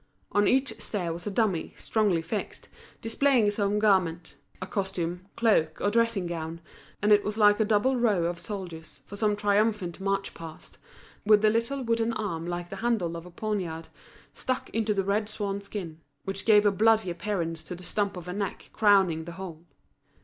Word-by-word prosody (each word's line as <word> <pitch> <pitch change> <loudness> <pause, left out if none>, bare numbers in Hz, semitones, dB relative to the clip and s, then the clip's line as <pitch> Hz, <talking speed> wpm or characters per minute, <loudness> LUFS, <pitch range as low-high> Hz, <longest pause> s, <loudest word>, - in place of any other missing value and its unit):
On 205 0 +3
each 265 +1 +1
stair 180 -6 -2
was 170 +4 -7
a - - +1
dummy, 195 -5 0
strongly 205 -7 +1
fixed, 205 +5 -5 0.3
displaying 225 -2 +3
some 205 0 0
garment: 185 -6 +2 0.3
a 185 - -4
costume, 185 -2 -3
cloak, 180 -9 +2
or 205 - +1
dressing 230 -4 +2
gown; 165 -1 -4 0.4
and 210 - +3
it 205 -1 +6
was 210 +1 -3
like 210 -1 +5
a - - +5
double 225 +5 +2
row 215 -7 +2
of 170 0 -2
soldiers 165 -9 -7
for 200 - -9
some 210 0 +1
triumphal 205 -2 +1
march 195 0 -1
past, 160 -1 -11 0.4
with 210 0 +5
the 215 - +5
little 235 +5 -1
wooden 230 0 +1
arm 175 -7 -3
like 175 0 -4
the 195 - -5
handle 215 -7 0
of 170 +1 -7
a - - -12
poniard, 175 -5 -3 0.4
stuck 255 0 -3
into 220 -1 0
the 195 - +1
red 205 +2 0
swan 200 -2 -3
skin, 190 -6 -7 0.2
which 195 0 -5
gave 210 -1 +6
a 205 - +5
bloody 220 -1 +3
appearance 170 -3 -3
to 180 - -7
the 180 - -12
stump 200 +1 -1
of 180 0 -8
a 180 - -4
neck 200 -1 -4
crowning 190 -7 +3
the 170 - -7
whole. 170 -3 -8
200 Hz, 185 wpm, -27 LUFS, 175-215 Hz, 0.4 s, it